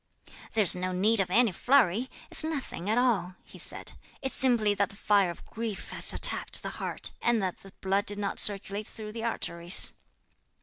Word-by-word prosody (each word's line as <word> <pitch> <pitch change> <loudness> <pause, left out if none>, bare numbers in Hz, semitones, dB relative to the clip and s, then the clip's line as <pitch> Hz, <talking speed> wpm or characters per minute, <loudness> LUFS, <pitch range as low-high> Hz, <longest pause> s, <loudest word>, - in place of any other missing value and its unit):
"There's 205 -6 +6
no 185 0 -4
need 210 +5 +2
of 195 - 0
any 230 +3 +3
flurry; 245 +2 +1 0.2
it's - - +7
nothing 280 - -5
at 220 - +1
all," 205 -8 0
he - - -16
said, - - -5 0.3
"it's 265 - 0
simply 235 -5 +3
that 200 0 -1
the 200 - -13
fire 200 -2 +1
of 170 - -10
grief 220 -3 -6
has - - +5
attacked - - +2
the - - -4
heart, - - -4
and 235 -1 +1
that 185 -2 -4
the 195 - -15
blood 195 +1 -1
did 205 - -3
not 200 -1 -4
circulate 200 +1 +1
through 215 -2 -9
the 225 +1 -7
arteries." 175 -6 +1
205 Hz, 185 wpm, -27 LUFS, 190-230 Hz, 0.3 s, it's